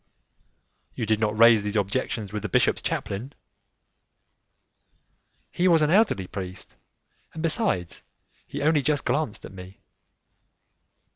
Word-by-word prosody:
"You -, -, -3 dB
did 110 Hz, 0 st, +1 dB
not 110 Hz, -1 st, -1 dB
raise 115 Hz, -1 st, +7 dB
these 105 Hz, +1 st, -4 dB
objections 105 Hz, 0 st, -2 dB
with 105 Hz, -, -3 dB
the 105 Hz, -, -4 dB
bishop's -, -, +2 dB
chaplain." 120 Hz, +9 st, -4 dB, 2.2 s
"He 180 Hz, -, +1 dB
was 165 Hz, -3 st, +4 dB
an 150 Hz, -, +2 dB
elderly 190 Hz, -, +3 dB
priest, 95 Hz, 0 st, -7 dB, 0.6 s
and 160 Hz, -, -5 dB
besides, 160 Hz, -, 0 dB, 0.5 s
he -, -, -5 dB
only 155 Hz, -1 st, +3 dB
just 145 Hz, 0 st, 0 dB
glanced 145 Hz, -8 st, -2 dB
at -, -, -11 dB
me." 95 Hz, 0 st, -12 dB
110 Hz, 125 wpm, -25 LUFS, 100-155 Hz, 2.2 s, raise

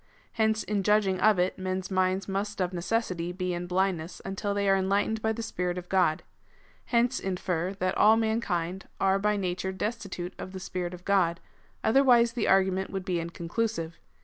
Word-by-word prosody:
Hence 220 Hz, -1 st, +1 dB
in 205 Hz, -1 st, -1 dB
judging 200 Hz, -2 st, +2 dB
of 215 Hz, 0 st, +4 dB
it, 180 Hz, +2 st, 0 dB
men's 185 Hz, +1 st, -3 dB
minds 185 Hz, 0 st, +1 dB
must 200 Hz, +1 st, -3 dB
of 185 Hz, 0 st, 0 dB
necessity 180 Hz, -2 st, -1 dB
be 180 Hz, 0 st, -2 dB
in 175 Hz, 0 st, -4 dB
blindness 180 Hz, -2 st, -1 dB
until 200 Hz, +1 st, -2 dB
they 200 Hz, 0 st, 0 dB
are 195 Hz, -, +5 dB
enlightened 200 Hz, +3 st, +1 dB
by 220 Hz, -, +1 dB
the 230 Hz, +1 st, -4 dB
Spirit 180 Hz, -5 st, -2 dB
of 180 Hz, 0 st, -7 dB
God.^ 180 Hz, -5 st, +2 dB, 0.6 s
Hence 245 Hz, +2 st, +2 dB
infer, 180 Hz, -1 st, -2 dB
that 185 Hz, -1 st, -1 dB
all 220 Hz, +1 st, +6 dB
mankind 195 Hz, -5 st, -1 dB
are 195 Hz, 0 st, +3 dB
by 210 Hz, +1 st, +1 dB
nature 185 Hz, 0 st, -2 dB
destitute 190 Hz, -3 st, -4 dB
of 185 Hz, -, -7 dB
the 190 Hz, -, -5 dB
Sjjirit 180 Hz, -1 st, -4 dB
of 180 Hz, -, -16 dB
God: 180 Hz, -4 st, +2 dB, 0.4 s
otherwise 240 Hz, -2 st, +5 dB
the 235 Hz, -3 st, -1 dB
argument 190 Hz, 0 st, +3 dB
would 190 Hz, -2 st, -4 dB
be 180 Hz, -3 st, 0 dB
inconclusive. 170 Hz, +1 st, -3 dB
190 Hz, 175 wpm, -28 LUFS, 180-210 Hz, 0.6 s, all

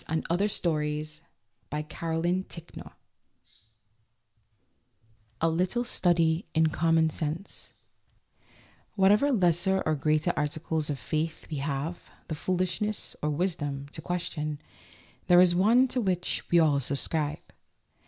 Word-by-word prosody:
A 160 Hz, -, 0 dB, 0.2 s
LITTLE 190 Hz, +4 st, +2 dB
STUDY 150 Hz, -5 st, 0 dB, 0.7 s
IN 150 Hz, 0 st, -2 dB
COMMON 165 Hz, +4 st, -2 dB
SENSE 170 Hz, -1 st, -8 dB, 2.5 s
A 165 Hz, -, +2 dB
LITTLE 180 Hz, +9 st, 0 dB
STUDY 175 Hz, -4 st, +2 dB
IN 160 Hz, 0 st, +4 dB
COM 165 Hz, +2 st, +1 dB
MON 160 Hz, -1 st, +3 dB
SENSE 155 Hz, +5 st, -5 dB, 1.2 s
WHATEVER 210 Hz, +8 st, +4 dB
lesser 190 Hz, -, +2 dB
or 155 Hz, -, +2 dB
greater 155 Hz, +1 st, +1 dB
articles 155 Hz, +1 st, -2 dB
of 145 Hz, -, -2 dB
faith 155 Hz, +6 st, -3 dB
we 150 Hz, -, -2 dB
have 145 Hz, +4 st, -4 dB, 0.2 s
the -, -, -2 dB
foolishness 185 Hz, +5 st, -2 dB
(or 150 Hz, -, 0 dB
wisdom) 145 Hz, -4 st, -2 dB
to -, -, -6 dB
question, 155 Hz, -4 st, -3 dB, 0.7 s
there 175 Hz, 0 st, +7 dB
is 180 Hz, -1 st, +6 dB
one 225 Hz, +8 st, +4 dB
to 250 Hz, -, 0 dB
which 180 Hz, -4 st, -1 dB
we 175 Hz, -, +4 dB
all 150 Hz, -4 st, +4 dB
subscribe. 145 Hz, +3 st, -3 dB
165 Hz, 120 wpm, -28 LUFS, 150-185 Hz, 2.5 s, there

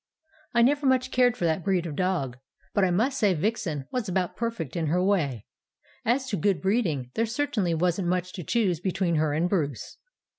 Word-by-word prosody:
"I 235 Hz, -, +6 dB
never 285 Hz, +3 st, +3 dB
much 260 Hz, 0 st, +2 dB
cared 245 Hz, -1 st, +3 dB
for 175 Hz, -, -1 dB
that 165 Hz, +1 st, 0 dB
breed 185 Hz, -2 st, +1 dB
of 155 Hz, -4 st, -5 dB
dog, 150 Hz, -9 st, -1 dB, 0.3 s
but 200 Hz, -, +2 dB
I 190 Hz, -, +3 dB
must 245 Hz, +10 st, +1 dB
say 200 Hz, -5 st, +3 dB
Vixen 165 Hz, -, -2 dB
was 245 Hz, -6 st, -2 dB
about 180 Hz, -1 st, -1 dB
perfect 230 Hz, -, -3 dB
in 165 Hz, -2 st, -1 dB
her 180 Hz, +4 st, +1 dB
way. 150 Hz, -, 0 dB, 0.6 s
As 255 Hz, +4 st, +1 dB
to 205 Hz, -, -1 dB
good 190 Hz, 0 st, +1 dB
breeding, 170 Hz, -, 0 dB
there 225 Hz, +1 st, 0 dB
certainly 220 Hz, -, 0 dB
wasn't 180 Hz, +2 st, 0 dB
much 180 Hz, 0 st, -1 dB
to 180 Hz, -, -6 dB
choose 190 Hz, -5 st, +1 dB
between 180 Hz, -2 st, 0 dB
her 155 Hz, -1 st, +1 dB
and 160 Hz, +4 st, +1 dB
Bruce. 150 Hz, -, -2 dB
185 Hz, 195 wpm, -26 LUFS, 165-225 Hz, 0.6 s, I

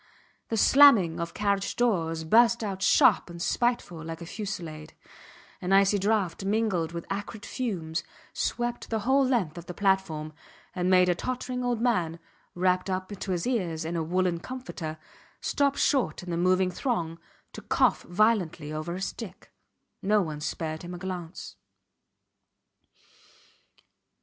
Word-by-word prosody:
The 225 Hz, -, -1 dB
slamming 225 Hz, -, +6 dB
of 170 Hz, 0 st, -4 dB
carriage 200 Hz, -1 st, 0 dB
doors 165 Hz, -9 st, 0 dB
burst 230 Hz, +7 st, +4 dB
out 195 Hz, -2 st, -4 dB
sharp 195 Hz, -, +4 dB
and 170 Hz, 0 st, -9 dB
spiteful 180 Hz, -5 st, -1 dB
like 165 Hz, 0 st, -6 dB
a 170 Hz, -, -8 dB
fusillade; 170 Hz, -6 st, -6 dB, 0.7 s
an 180 Hz, -, -2 dB
icy 195 Hz, +1 st, +5 dB
draught 200 Hz, -2 st, 0 dB
mingled 195 Hz, -5 st, 0 dB
with 170 Hz, 0 st, -6 dB
acrid 205 Hz, +2 st, -5 dB
fumes 175 Hz, -10 st, -3 dB, 0.3 s
swept 240 Hz, 0 st, -2 dB
the 220 Hz, -1 st, -1 dB
whole 265 Hz, +5 st, +3 dB
length 215 Hz, -, 0 dB
of 170 Hz, -, -12 dB
the 180 Hz, -, -7 dB
platform 190 Hz, -6 st, 0 dB, 0.4 s
and 180 Hz, 0 st, 0 dB
made 180 Hz, -1 st, +5 dB
a 180 Hz, -, +4 dB
tottering 250 Hz, +5 st, -3 dB
old 240 Hz, -2 st, -1 dB
man, 180 Hz, -10 st, +1 dB, 0.4 s
wrapped 185 Hz, +1 st, +1 dB
up 185 Hz, 0 st, -2 dB
to 200 Hz, -1 st, -5 dB
his 175 Hz, -2 st, -1 dB
ears 180 Hz, -10 st, -1 dB
in 170 Hz, +2 st, -3 dB
a 165 Hz, -, 0 dB
woollen 175 Hz, +1 st, 0 dB
comforter, 185 Hz, -10 st, -6 dB, 0.4 s
stop 280 Hz, -1 st, +1 dB
short 270 Hz, -9 st, +1 dB
in 180 Hz, -, -6 dB
the -, -, 0 dB
moving 185 Hz, +1 st, +2 dB
throng 175 Hz, -, -2 dB, 0.3 s
to -, -, -8 dB
cough -, -, +2 dB
violently 175 Hz, -6 st, +1 dB
over 155 Hz, +3 st, -4 dB
his 190 Hz, +1 st, -2 dB
stick. 205 Hz, -6 st, -8 dB, 0.5 s
No 205 Hz, +1 st, +3 dB
one 155 Hz, -3 st, -5 dB
spared 155 Hz, +1 st, -3 dB
him 175 Hz, 0 st, -7 dB
a -, -, -7 dB
glance. 180 Hz, -1 st, -7 dB
185 Hz, 150 wpm, -27 LUFS, 170-220 Hz, 0.7 s, slamming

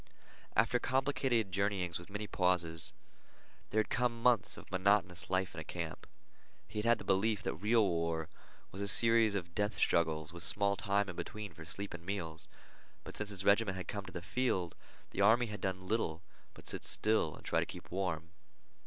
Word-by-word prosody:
After 125 Hz, -, +3 dB
complicated 130 Hz, -5 st, +1 dB
journeyings 95 Hz, -3 st, 0 dB
with 85 Hz, -, -12 dB
many 105 Hz, +1 st, -4 dB
pauses, 90 Hz, -4 st, +2 dB, 0.8 s
there 110 Hz, -, +3 dB
had -, -, -7 dB
come 120 Hz, -2 st, +1 dB
months 125 Hz, -5 st, +3 dB
of -, -, -12 dB
monotonous 95 Hz, -1 st, +2 dB
life 95 Hz, 0 st, 0 dB
in -, -, -6 dB
a -, -, -5 dB
camp. 85 Hz, -1 st, -6 dB, 0.6 s
He 105 Hz, -, -5 dB
had 105 Hz, -, -1 dB
had 120 Hz, -1 st, +5 dB
the -, -, -9 dB
belief 100 Hz, +2 st, +1 dB
that -, -, -1 dB
real 105 Hz, +4 st, +3 dB
war 85 Hz, -2 st, -1 dB, 0.4 s
was 95 Hz, -, -6 dB
a 100 Hz, -, -1 dB
series 115 Hz, 0 st, +5 dB
of 85 Hz, -3 st, -4 dB
death 105 Hz, +2 st, 0 dB
struggles 80 Hz, -1 st, +1 dB
with 85 Hz, -, -8 dB
small 100 Hz, +3 st, +1 dB
time 100 Hz, +1 st, +1 dB
in 90 Hz, -, -6 dB
between 105 Hz, -1 st, -6 dB
for 80 Hz, 0 st, -11 dB
sleep 100 Hz, +5 st, -5 dB
and 85 Hz, -1 st, -8 dB
meals; 85 Hz, -4 st, -4 dB, 0.6 s
but -, -, -9 dB
since 105 Hz, -1 st, -3 dB
his 100 Hz, -1 st, -3 dB
regiment 100 Hz, -2 st, +4 dB
had 95 Hz, -, -6 dB
come 100 Hz, -2 st, -4 dB
to 95 Hz, -, -9 dB
the 85 Hz, -2 st, -6 dB
field 95 Hz, -7 st, 0 dB, 0.4 s
the -, -, -2 dB
army 115 Hz, +4 st, +6 dB
had 105 Hz, -2 st, -7 dB
done 95 Hz, -1 st, -3 dB
little 85 Hz, -6 st, -1 dB, 0.3 s
but -, -, -13 dB
sit -, -, -4 dB
still 110 Hz, -9 st, +1 dB
and -, -, -15 dB
try -, -, +2 dB
to -, -, 0 dB
keep -, -, -9 dB
warm. 85 Hz, -3 st, -2 dB
100 Hz, 195 wpm, -34 LUFS, 85-105 Hz, 0.8 s, army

